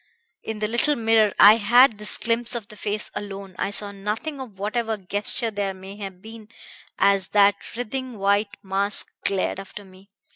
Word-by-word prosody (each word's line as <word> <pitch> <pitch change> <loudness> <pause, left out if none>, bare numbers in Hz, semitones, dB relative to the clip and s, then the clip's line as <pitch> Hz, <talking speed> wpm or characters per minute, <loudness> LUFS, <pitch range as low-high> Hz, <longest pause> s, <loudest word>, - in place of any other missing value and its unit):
In 220 - -6
the 210 0 -2
little 235 +7 +2
mirror 225 -3 +3
I 210 +2 +9
had 235 +1 +4
this 210 0 +1
glimpse 235 +1 0
of 225 -4 -6
the 210 - -10
face 210 0 -3
alone; 195 -2 -8
I - - -1
saw 205 0 -3
nothing 210 +9 -5
of 225 -7 -10
whatever 220 +2 -2
gesture 205 +5 +2
there 200 -2 -3
may 190 +1 -11
have 195 -3 -9
been 220 -1 -12 0.5
as 195 -1 +2
that 200 +2 +2
writhing 250 0 -5
white 200 +1 0
mask 195 +1 0
glared 195 -1 -1
after 195 +1 -10
me. 190 +1 -19
210 Hz, 175 wpm, -23 LUFS, 200-225 Hz, 0.5 s, I